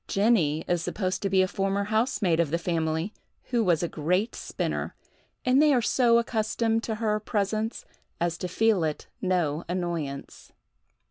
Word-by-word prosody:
Jenny 195 -8 +2
is 175 -1 +1
supposed 185 +1 -2
to 195 - 0
be 190 0 +4
a - - +1
former 195 +1 -1
housemaid 210 -5 +1
of 165 -3 +2
the 165 - +1
family, 165 +2 -1 0.4
who 235 -2 +2
was 175 -4 +2
a - - +1
great 180 +9 0
spinner, - - -3 0.5
and 255 +3 +5
they 300 -2 +5
are - - +4
so 235 -1 +4
accustomed 225 -1 0
to 220 - -2
her 215 -1 0
presence 215 +2 -2 0.3
as 170 0 0
to 180 - -3
feel 210 0 +2
it 155 -1 -2 0.2
no 175 -4 0
annoyance. 170 -6 -4
195 Hz, 160 wpm, -27 LUFS, 170-220 Hz, 0.5 s, and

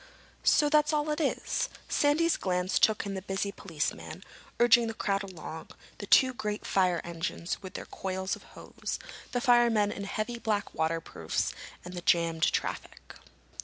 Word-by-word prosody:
"So 295 - +5
that's 300 +1 +3
all 300 0 +1
it 300 +2 -1
is!" 290 - 0 0.2
Sandy's 315 +3 +3
glance 180 0 0
took 220 -1 +3
in 200 - -3
the 190 - -4
busy 195 +1 -2
policemen, 165 -7 -4 0.4
urging 240 0 +6
the 225 - -4
crowd 195 -2 0
along, 175 -4 -8 0.3
the - - -6
two 260 -2 +6
great 210 -3 -4
fire 180 -3 +2
engines 170 +1 -4
with 190 -2 -9
their - - -5
coils 190 0 -3
of - - -14 0.2
hose, - - -5 0.3
the 245 - 0
firemen 235 -4 +4
in 200 -1 -5
heavy 215 +4 -3
black 210 -3 -1
waterproofs, 160 - -1 0.3
and 180 - -7
the 175 - -5
jammed 165 -2 +2
traffic. - - -4
200 Hz, 160 wpm, -29 LUFS, 180-240 Hz, 0.4 s, urging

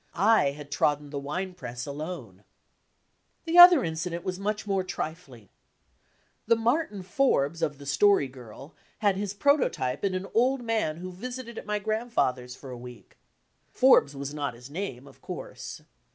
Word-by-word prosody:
I 215 +5 +4
had 145 -1 -10
trodden 145 -1 0
the 145 - -3
wine 180 +7 -4
press 125 -8 -7
alone. 140 - -7 1.0
The 340 +1 +4
other 350 -6 +10
incident 170 +1 -3
was 185 0 -4
much 210 +2 -2
more 195 -2 0
trifling. 155 - -7 1.0
The 230 - +5
"Mar 240 +8 +1
tin 200 -3 -9
Forbes" 170 - +1
of 150 -3 -1
7'j&*i/or)'<J"'/ 135 - 0 0.3
had 205 -3 +2
his 200 0 -3
prototype 190 - +1
in 195 -2 0
an 185 +1 -3
old 250 +2 +2
man 220 -9 -1
who 185 +2 -7
visited 240 +4 -7
at - - -12
my 210 0 0
grandfather's 205 - -1
for 130 0 -10
a 125 - -7
week. 125 -1 -13 0.5
Forbes 250 - +4
was 140 +1 -5
not 145 -5 -3
his 125 +3 -13
name, 145 -7 -5
of - - -17
course. - - -8
180 Hz, 155 wpm, -27 LUFS, 140-215 Hz, 1.0 s, other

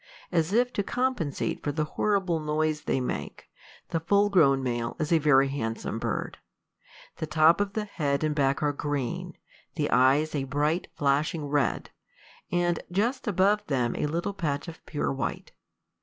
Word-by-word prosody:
As 165 -1 +1
if 245 +3 +2
to - - 0
compensate 245 - -1
for 145 - 0
the 155 +1 -1
horrible 185 +1 0
noise 155 0 0
they - - +1
make, 100 - -5 0.4
the 165 - 0
full 200 +5 +2
grown 135 -8 +4
male 120 -2 -2
is 155 +1 -2
a 165 - +5
very 140 -3 +4
handsome 115 -4 -3
bird. - - -3 0.8
The 160 - -3
top 155 +4 +4
of 200 -1 -2
the 215 0 -2
head 145 -7 -1
and 155 -1 +1
back 140 -1 +1
are 145 -1 +2
green, 140 -4 -3 0.4
the - - -1
eyes 135 +5 +4
a 140 -3 -1
bright, 150 +5 0
flashing 145 +2 0
red, 145 -1 0 0.6
and 175 -1 +1
just 235 +8 0
above 205 +2 +3
them 125 -4 0
a - - -1
little 170 +6 -2
patch 150 -5 -2
of 165 - -10
pure 145 -3 -1
white. 135 - -4
155 Hz, 165 wpm, -27 LUFS, 140-180 Hz, 0.8 s, a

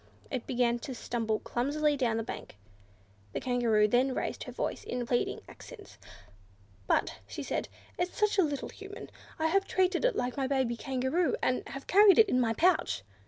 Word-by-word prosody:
It 255 -4 -3
began 240 -1 +1
to 260 +2 -6
stumble 225 -2 -1
clumsily 290 +6 0
down 240 -5 0
the 225 - -1
bank. 160 - -8 0.8
The - - -2
Kangaroo 235 -4 +2
then 255 +4 +2
raised - - -3
her - - -7
voice - - -3
in 245 -1 -3
pleading 240 0 -1
accents. 435 -5 -13 0.9
"But," - - +1
she 110 - -6
said, - - -2 0.3
"it's 355 0 -2
such 420 -1 +2
a - - +6
little 290 -3 -2
Human! 405 +2 -10 0.3
I 315 - -1
have 390 +4 +2
treated 370 0 +1
it - - +2
like 245 +2 -2
my 270 -1 0
baby 260 -3 0
Kangaroo, 265 +8 0
and 255 - +1
have 275 - -7
carried 400 0 +6
it 445 -3 +6
in 255 - +3
my 225 -2 +1
pouch." 340 - +2
265 Hz, 180 wpm, -30 LUFS, 240-360 Hz, 0.9 s, a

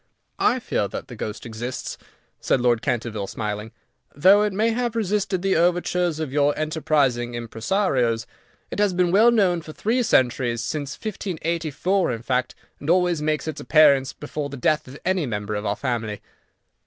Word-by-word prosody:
"I - - +3
fear - - -1
that - - -7
the - - -8
ghost 105 +1 -6
exists," 120 +2 -5 0.4
said - - +1
Lord 120 -2 +2
Canterville, 110 -4 -2
smiling, 105 +1 -4 0.4
"though 190 +8 +6
it 210 0 +1
may 215 +4 +1
have 240 0 -1
resisted 200 -3 0
the 195 -1 +2
overtures 175 -1 +1
of 155 -4 -4
your 145 0 +2
enterprising 145 -6 0
impresarios. 120 - 0 0.5
It - - -4
has 205 -2 +3
been 180 -1 +2
well 215 +5 +6
known 190 -7 +2
for 155 -1 -10
three 235 +9 0
centuries, 120 - +2
since 145 +3 -3
1584 175 - -1
in 115 0 -6
fact, 125 0 -1 0.2
and 145 - -6
always 175 -2 +3
makes 155 +1 -1
its 155 -2 -4
appearance 140 -1 +5
before 145 0 -5
the 140 - -7
death 150 +4 +1
of 130 +3 -10
any 185 -5 +1
member 105 -2 -3
of 105 0 -3
our 100 - 0
family." 115 -5 -3
150 Hz, 165 wpm, -23 LUFS, 120-180 Hz, 0.5 s, though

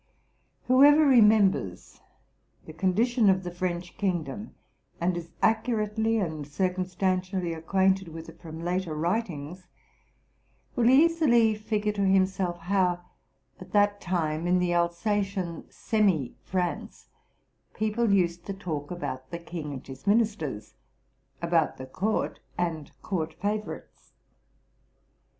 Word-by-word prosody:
Whoever 290 +4 +6
remembers 210 - +3 0.6
the 155 - -10
condition 215 +7 +2
of 190 0 +2
the 175 - -5
French 175 0 -4
kingdom, 185 0 -2 0.4
and 175 +1 +1
is 170 -1 -6
accurately 220 -1 +1
and 160 -8 -3
circumstantially 185 +1 -1
acquainted 190 +3 +1
with 165 0 -9
it 165 +1 -14
from 165 -1 -8
later 175 -2 -1
writings, 175 -1 -3 1.1
will 240 -1 +4
easily 265 -6 +5
figure 215 0 -1
to 205 -1 -3
himself 190 -2 +2
how, 180 -1 +1 0.6
at - - -12
that 205 -1 +3
time, 165 -2 -1
in 180 +1 +3
the 180 -1 +1
Alsatian 180 0 -1
semi 190 - 0
France, 180 -2 -3 0.7
people 220 +1 0
used 175 -3 +1
to 195 - -4
talk 155 -7 -5
about 130 -7 -5
the 170 - -4
king 170 -3 -6
and 130 -2 -7
his 135 +7 -11
ministers, 200 - 0 0.7
about 170 -2 +1
the 130 - -7
court 200 +11 -2 0.2
and 165 -4 -2
court 160 -4 -3
favor 210 +2 -3
ites. - - -32
185 Hz, 120 wpm, -27 LUFS, 170-210 Hz, 1.1 s, Whoever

